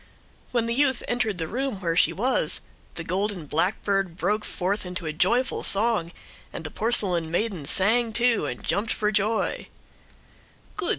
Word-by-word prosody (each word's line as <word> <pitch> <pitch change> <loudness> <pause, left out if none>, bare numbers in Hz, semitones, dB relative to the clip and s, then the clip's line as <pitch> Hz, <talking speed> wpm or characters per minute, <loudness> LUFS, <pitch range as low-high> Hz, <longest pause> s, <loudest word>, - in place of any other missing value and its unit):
When 235 -2 +1
the 230 - -1
youth 265 -1 +2
entered 225 -5 0
the 165 -2 -2
room 255 +1 -3
where 170 -3 -1
she - - +5
was 250 +7 +1 0.3
the 165 - -5
golden 190 0 -2
blackbird 185 +3 0
broke 210 +5 0
forth 195 +3 -2
into 180 -1 -5
a 155 - -2
joyful 245 - +2
song, 205 -5 +2 0.4
and - - -5
the 155 - -5
porcelain 190 -7 +1
maiden 175 -4 -2
sang 225 +4 +3
too 235 -7 +2
and 125 - -6
jumped 215 +2 0
for 210 0 0
joy. 215 +2 0
200 Hz, 155 wpm, -25 LUFS, 175-230 Hz, 0.4 s, she